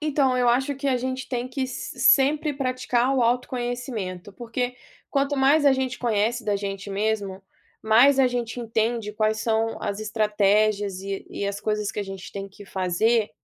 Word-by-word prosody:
Então 280 -4 +1
eu 250 -1 +3
acho 265 +4 +2
que 275 +1 -2
a 255 - +2
gente 260 +1 -4
tem 245 -1 -2
que 260 0 -2
se 260 - -7
sempre 295 +2 +4
praticar 255 -1 0
o 255 - +3
autoconhecimento, 240 -6 -2
porque 245 +3 -4 0.3
quanto 280 0 0
mais 280 +3 +4
a 280 - +6
gente 265 -1 -2
conhece 230 0 0
da 205 -1 +1
gente 200 0 -5
mesmo, 200 -1 -2 0.4
mais 240 +6 +5
a 265 - +6
gente 245 -1 -3
entende 225 -1 -1
quais 215 0 0
são 225 0 0
as 205 -1 -3
estratégias 210 -2 +1
e 195 0 -5
e 200 - -3
as 200 0 -3
coisas 210 -1 -1
que - - -3
a - - -1
gente 195 -1 -8
tem 195 0 -6
que 200 +1 -14
fazer 200 +4 +1
230 Hz, 180 wpm, -24 LUFS, 205-255 Hz, 0.4 s, a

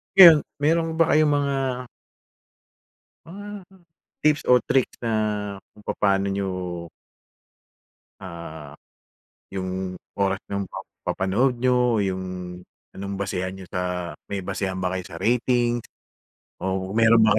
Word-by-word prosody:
Ngayon, 170 -5 +11 0.2
meron 165 +2 +3
ba 165 -1 +3
kayong 155 0 +5
mga 145 -1 +2 1.7
Ah, 205 +3 -8 0.6
tips 150 -2 +3
o 125 -1 +6
tricks 130 -1 +2
na, 105 -3 -1 0.2
kung 105 - -17
papa'no 100 -1 +1
n'yo 100 0 -1 1.7
Ah, 85 -5 -8 0.8
'yong 95 -1 -3 0.2
oras 95 -1 +2
nung 100 -1 -2
pagpapanood 105 +11 -1
niyo, 125 -3 +3
'yung 95 -1 -1 0.7
anong 100 0 -5
basehan 95 -1 -2
niyo 95 - -9
sa, 90 -2 -2 0.2
may 100 -1 -3
basehan 95 0 -2
ba 90 - +1
kayo 95 0 -2
sa 85 - -10
ratings 120 0 +1 0.7
o 95 0 -2
meron 115 +2 +5
ba 110 -1 +5
100 Hz, 115 wpm, -24 LUFS, 95-125 Hz, 1.7 s, Ngayon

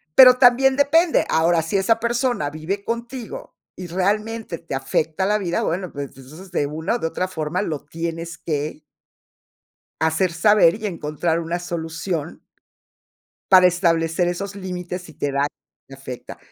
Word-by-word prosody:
pero, 255 -1 +9
también 265 +1 +5
depende. 315 +4 +3
Ahora, 165 +1 +3
si 165 +5 -1
esa 195 +4 +2
persona 240 - 0
vive 165 +7 -4
contigo, 240 - -6 0.2
y 180 -1 -6
realmente 210 +2 -1
te 165 -5 -6
afecta 155 +6 -1
la 210 +2 +2
vida, 175 -4 -1
bueno, 180 +1 -2
pues, 140 -1 -5
entonces, 155 +8 -13
de 145 -5 0
una 160 +9 -2
o - - -2
de 165 - -1
otra 185 +3 -2
forma 165 +2 -2
lo 155 -7 -4
tienes 165 +2 -5
que 150 -1 -3 1.2
hacer 160 +3 +1
saber 175 -1 +5
y 215 0 -5
encontrar 160 -1 -2
una 170 +1 -3
solución 165 -1 -4 1.1
para 185 -1 +8
establecer 170 -1 +1
esos 195 +3 -4
límites, 180 -1 -5
si 160 -3 -13
te 145 - -2
da, 140 +1 +1
y 140 -1 -17
te 135 - -11
afecta. 130 -2 -9
175 Hz, 155 wpm, -22 LUFS, 160-205 Hz, 1.2 s, pero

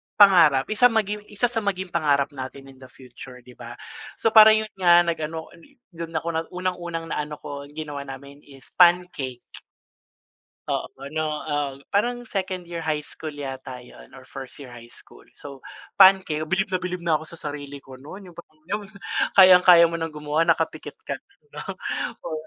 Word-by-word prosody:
pangarap 170 -10 +6 0.3
maging 210 -1 0
isa 235 +4 -1
sa 230 - -1
maging 190 -3 -3
pangarap 145 -3 +1
natin 135 0 -9
in 130 - -20
the 130 - -13
future, 125 0 -13
'di 125 - -15
ba? 120 0 -10 0.4
So, 225 - 0
parang 220 0 +8
'yon 215 - -10
nga 175 -1 +6
nag 170 -1 -2
ano 160 +1 -5 0.4
dun 165 -1 -7
ako 160 +1 -2
na 160 0 -1
unang 180 0 -2
unang 170 -1 -5
na - - -2
ano 150 0 -7
ko 140 -1 -8
ginawa 145 -1 -7
namin 140 +1 -10
is 135 -2 -17
pancake. 175 -8 +3 1.2
Oo, - - -2
ano, 140 +4 -4 0.2
ah, 145 -3 -2 0.2
parang 240 +4 0
second 190 -4 -4
year 170 -1 -6
high 155 -2 -2
school 155 - -8
yata 135 -3 -7
'yon - - -16
or - - -14
first 135 -2 -10
year 130 -4 -11
high 120 0 -13
school. - - -17
So, 140 -2 -12 0.3
pancake 190 -5 +5
bilib 190 +1 -1
na 185 - 0
bilib 180 0 -4
na 165 - +2
ako 155 - -9
sa 170 - -10
sarili 145 -2 -7
ko 130 -1 -14
no'n 180 +5 -11
yung 170 - -10 1.0
kayang-kaya 180 -2 +8
mo 170 - -2
ng 165 - -2
gumawa 150 +1 -1
nakapikit 165 -1 -1
ka - - -5 0.3
na, - - -7 0.6
oh. 155 -1 -4
160 Hz, 175 wpm, -23 LUFS, 140-180 Hz, 1.2 s, parang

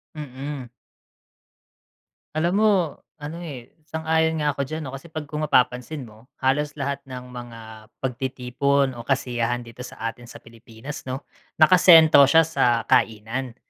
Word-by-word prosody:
Mm. 140 -2 -6 1.7
Alam 170 +3 +1
mo 215 0 +5 0.5
ano, 155 +2 -7
eh, 135 -8 -8 0.2
sang-ayon 160 0 0
nga 150 0 +2
ako 140 - -3
diyan 155 +2 -5
'no, 130 - -6
kasi 135 +4 -9
pag 155 -1 -5
kung 150 +1 -5
mapapansin 125 0 +1
mo, 110 +2 -17 0.2
halos 145 +3 +1
lahat 140 0 -2
ng 125 -1 -8
mga 120 -2 -9 0.4
pagtitipon 130 +2 0
o 120 - -8
kasiyahan 120 -3 -1
dito 115 +1 -14
sa 125 - -9
atin 120 +1 -16
sa - - -10
Pilipinas 115 +5 -10
'no, 130 +2 -4 0.3
nakasentro 160 -3 +7
siya 160 +3 +6
sa 120 -7 +1
kainan. 115 +3 0
135 Hz, 140 wpm, -23 LUFS, 125-155 Hz, 1.7 s, nakasentro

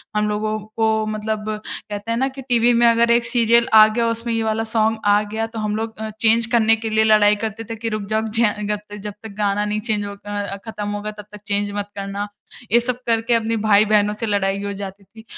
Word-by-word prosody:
हम 210 0 +1
लोगों 215 +1 -1
को 220 +1 -1
मतलब 215 0 -3 0.2
कहते 205 +2 -6
हैं 230 - 0
ना 265 +2 +1
कि 270 0 -8
टीवी 245 -2 +2
में 235 0 +4
अगर 235 0 +4
एक 235 0 +3
सीरियल 235 -1 +3
आ 215 -1 +9
गया 230 +2 0
उसमें 230 +1 -2
ये 225 - 0
वाला 220 0 0
सॉन्ग 220 0 0
आ 205 0 +4
गया 220 +2 -3
तो 225 0 -7
हम 210 -1 -1
लोग 220 +1 -4
अ, 220 0 -4
चेंज 230 0 +4
करने 225 -2 +4
के 225 0 -5
लिए 220 0 +3
लड़ाई 215 -1 +5
करते 220 +1 -5
थे 225 - -4
कि 225 +1 -4
रुक 215 -1 -3
जाओ 220 0 +1
जी 220 +1 -1
हाँ, 210 -2 +2
ग 210 0 -1
ते 205 - -8
जब 210 0 -6
तक 220 - -7
गाना 205 0 +1
नहीं 210 0 -1
चेंज 215 -2 -2
होगा 205 0 -6
अ, 200 0 -5
खत्म 210 -2 -5
होगा 205 +1 -4
तब 210 - -9
तक 210 -1 -11
चेंज 205 0 0
मत 205 0 -3
करना। 200 +1 -4 0.4
ये 235 - +6
सब 245 +1 -2
करके 230 +1 +1
अपने 230 0 +1
भाई-बहनों 210 0 +4
से 215 +2 -4
लड़ाई 200 -2 0
हो 200 - -3
जाती 195 0 -8
थी। 220 +4 -16
215 Hz, 245 wpm, -20 LUFS, 205-225 Hz, 0.4 s, आ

